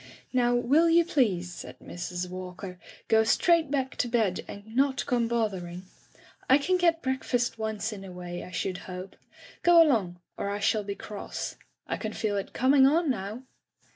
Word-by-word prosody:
'* - - -34
"Now, 245 -1 +3
will 285 +8 +4
you 335 +1 +5
please,'* 195 - +1
said - - -9
Mrs. 180 +1 -5
Walker, 185 0 -7 0.3
"go 220 0 +5
straight 325 +7 +3
back 265 -2 -1
to - - +1
bed 225 -6 +1
and 210 +3 -10
not 270 0 +2
come 240 -3 +1
both 230 -2 +1
ering? 175 0 -7 0.7
I 265 - +8
can 365 +6 +1
get 335 -2 +2
breakfast 250 -3 -1
once 220 0 -2
in 195 -2 -8
a 190 - -9
way, 175 -1 -6
I - - -9
should 185 0 -3
hope. 185 +1 -7 0.5
Go 345 -1 +6
along, 220 - +3 0.2
or 200 - -2
I 205 0 -2
shall 210 0 +1
be 200 0 -4
cross. 210 -1 -6 0.3
I - - -3
can - - -4
feel 210 -2 -1
it 200 - -3
coming 265 +1 +5
on 315 +1 +3
now.' 215 +2 -5
220 Hz, 185 wpm, -28 LUFS, 190-265 Hz, 0.7 s, I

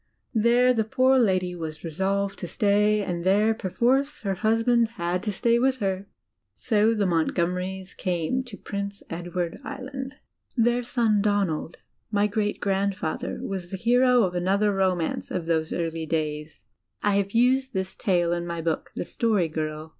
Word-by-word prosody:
There 240 +2 +4
the 225 -2 +1
poor 260 +3 +3
lady 185 -5 +2
was 160 -3 -6
resolved 195 +4 -1
to 175 - -5
stay, 210 +3 +2
and 175 -3 -3
there, 205 +4 +3
perforce, 240 +7 0
her 195 -3 -1
husband 225 +3 +2
had 175 +1 -1
to 210 - -2
stay 235 +4 +2
with 260 +1 +2
her. 195 -3 -2 0.5
So 220 0 +2
the 205 -2 +1
Montgomerys 180 +2 -1
came 180 +8 -1
to 225 -5 -10
Prince 200 0 -5
Edward 175 0 -3
Island. 265 +1 -6 0.4
Their 240 +1 +3
son 230 -3 +1
Etonald, 195 -6 0 0.3
my 205 -1 +2
great 210 0 -1
grandfather, 195 -4 -2
was 190 -3 -4
the 190 - -4
hero 245 +3 +4
of 180 -2 0
another 195 +4 +1
romance 185 -4 0
of 175 -3 -3
those 160 -1 0
early 165 -1 -2
days. 150 -1 -3 0.4
I 205 -1 +3
have 200 0 -1
used 260 +3 +3
this 190 0 -2
tale 175 -5 +1
in 175 0 -3
my 170 -1 -4
book. 165 -1 -2
The - - -3
Story 210 -7 +1
Girl. 155 0 -4
200 Hz, 160 wpm, -25 LUFS, 175-225 Hz, 0.5 s, There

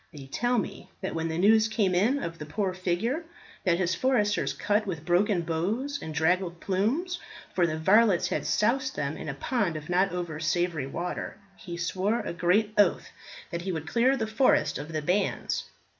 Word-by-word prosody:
They 140 -3 -10
tell 240 - 0
me 210 - -4
that - - -3
when 165 0 -1
the 160 0 -3
news 215 +4 +5
came 210 -4 +1
in 230 +11 +2
of 165 0 -5
the 150 - -5
poor 190 +4 -1
figure 185 - -1 0.4
that 175 -2 +3
his 185 -1 +1
foresters 210 -1 +1
cut 210 +1 0
with 165 -4 -4
broken 180 +1 +2
bows 210 - -2
and 160 - -5
draggled 170 +3 +1
plumes 255 - 0 0.3
for 175 -2 +3
the 155 -1 -2
varlets 195 +3 +4
had - - -2
soused 260 +5 +1
them 145 +1 -2
in - - -6
a 140 - -4
pond 205 - -1
of 150 +1 -7
not 185 +2 +2
over 175 -3 -4
savoury 160 -2 0
water 175 +7 -4 0.2
he 175 -3 -8
swore 190 +6 0
a - - -4
great 195 +5 +2
oath 200 -4 +3 0.4
that 170 -1 -3
he 190 +2 -3
would 160 -3 -4
clear 250 +8 +3
the 225 - -1
forest 220 +4 +2
of 150 - -7
the 155 -2 -2
bands. 180 +6 0
185 Hz, 190 wpm, -28 LUFS, 170-220 Hz, 0.4 s, news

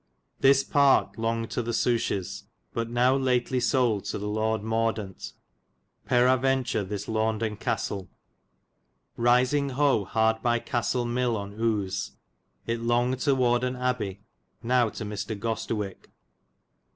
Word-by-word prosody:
This 135 0 +5
parke 140 -1 +3
longgid 115 0 -2
to - - -1
the 120 0 -3
Souches, 115 -7 -1 0.3
but 115 0 -2
now 125 +2 +3
lately 130 -1 +1
sold 120 -5 +1
to - - -3
the 105 0 -4
Lord 110 0 -1
Mordant 110 -3 -2 0.7
Peraventure 130 -2 +2
this 100 +1 -5
Launden 110 0 -1
Castel. 95 -3 -2 1.1
Risingho 130 -1 +2
hard 110 +1 +1
by 120 0 +2
Castel 120 0 -1
Mille 120 -1 0
on 100 0 -6
Use. 105 -3 -2 0.5
It 115 0 -2
longgid 120 +2 +1
to 140 -2 +4
Wardon 125 0 +1
Abbay, 125 -6 -2 0.4
now 120 -1 +3
to 110 - -6
Mr. 105 +1 -4
Gostewik. 105 -3 -3
115 Hz, 120 wpm, -27 LUFS, 110-125 Hz, 1.1 s, This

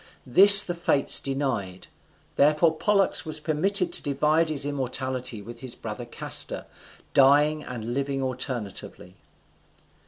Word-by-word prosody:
This 195 +10 +8
the 175 - -5
Fates 170 -5 +1
denied; 130 -10 -4 0.5
therefore 155 +3 +2
Pollux 200 +3 0
was 155 -2 -4
permitted 175 +4 -1
to - - -1
divide 150 +3 0
his 140 -3 0
immortality 130 -4 -4
with 120 +2 -11
his 125 -1 -4
brother - - -8
Castor, - - -2 0.5
dying 145 +3 +3
and 120 -1 -7
living 140 +1 -3
alternately. 125 -8 -6
140 Hz, 120 wpm, -24 LUFS, 125-155 Hz, 0.5 s, This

